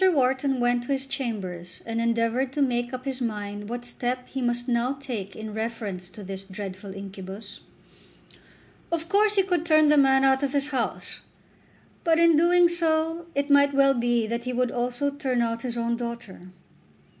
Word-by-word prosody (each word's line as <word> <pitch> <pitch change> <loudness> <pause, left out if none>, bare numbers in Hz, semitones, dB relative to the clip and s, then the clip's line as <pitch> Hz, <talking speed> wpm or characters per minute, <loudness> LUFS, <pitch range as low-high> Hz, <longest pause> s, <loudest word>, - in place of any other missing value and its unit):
Wharton 265 -2 +1
went 245 0 +2
to 275 - 0
his 270 0 -2
chambers 200 -10 -4
and 230 0 -2
endeavoured 230 +3 +1
to 290 - -1
make 240 -2 0
up 255 0 -6
his 265 -1 -3
mind 205 -2 -4
what 240 +1 -5
step 250 +1 -3
he 265 - -4
must 240 0 -1
now 245 +1 +1
take 240 -9 -6
in 220 -1 -7
reference 215 -5 -4
to 210 - -11
this 195 0 -6
dreadful 195 0 -7
incubus. 195 +1 -8 1.3
Of 335 -1 -1
course 415 +2 +3
he 390 - +4
could 355 -4 0
turn 310 -2 +5
the 300 - +5
man 270 -1 +5
out 265 0 +4
of 280 -1 -1
his 280 0 +1
house, 260 -5 -3 0.8
but 330 -2 +3
in 335 0 +6 0.4
so 325 -2 +1
doing 340 - -13
it 280 +1 0
might 280 0 +5
well 275 0 +5
be 240 -2 +1
that 235 +2 -3
he 250 - -2
would 250 0 +1
also 250 +4 -1
turn 270 -3 -1
out 230 0 -2
his 240 -1 -4
own 235 0 0
daughter. 235 -6 -7
245 Hz, 180 wpm, -26 LUFS, 225-275 Hz, 1.3 s, in